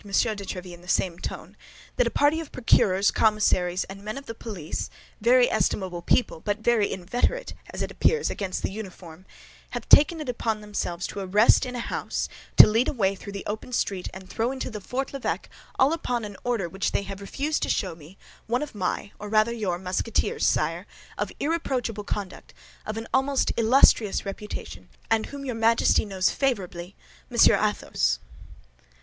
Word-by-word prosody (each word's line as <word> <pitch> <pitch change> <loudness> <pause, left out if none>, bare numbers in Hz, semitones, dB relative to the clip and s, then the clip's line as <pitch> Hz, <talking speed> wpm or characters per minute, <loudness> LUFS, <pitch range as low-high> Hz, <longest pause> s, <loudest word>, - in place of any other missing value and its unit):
de - - -13
Tréville, 195 -4 -1
in 175 - -12
the 180 - -16
same 175 -1 0
tone, - - -7 0.4
"that - - +3
a - - +2
party 295 +3 +2
of 325 -3 -7
procureurs, 200 -5 +3
commissaries, 190 -4 +2
and 195 +1 -10
men 215 +4 -5
of 275 - -8
the 230 - -6
police—very 230 +5 0
estimable 185 -3 0
people, 175 0 +1
but 205 +4 -1
very 220 -2 +2
inveterate, 245 - -1 0.2
as - - -4
it - - -4
appears, 465 -1 +2
against 195 -2 -3
the - - -1
uniform—have 185 -4 -10
taken 310 +3 +7
upon 230 -3 -1
themselves 190 -4 -3
to - - -5
arrest 205 +6 +4
in 250 - -6
a - - -3
house, - - -3 0.3
to - - +13
lead 225 +4 +2
away 200 -7 +1
through 200 +1 -9
the 200 - -6
open 215 +4 -5
street, 195 -6 -1
and 190 0 -10
throw 230 +5 -1
into 250 -5 -5
Fort 265 +7 -3
l'Evêque, 275 - -2 0.3
all 270 +4 +4
upon 245 -8 -2
an 205 -1 -8
order 235 -7 0
which 190 +3 -2
they - - +1
have 195 0 -7
refused 285 +9 -2
to - - -1
show 185 -5 0
me, 160 +4 -15 0.3
one 245 +5 0
of 300 - -7
my, 205 0 -2
or 210 - -6
rather 215 +2 +3
your 200 -7 -2
Musketeers, 190 +5 -1
sire, - - 0 0.3
of - - -3
irreproachable 255 -9 -1
conduct, 200 -3 -5 0.3
of 215 +1 -3
an 225 - -4
almost 270 +1 +2
illustrious 230 -3 +4
reputation, 195 - -7 0.2
and 225 -1 +2
whom 280 -1 -8
your 255 - -2
Majesty 225 0 +3
knows 190 -2 +1
favorably, 190 -8 -2 0.3
Monsieur - - +6
Athos." - - 0
210 Hz, 170 wpm, -26 LUFS, 190-245 Hz, 0.4 s, to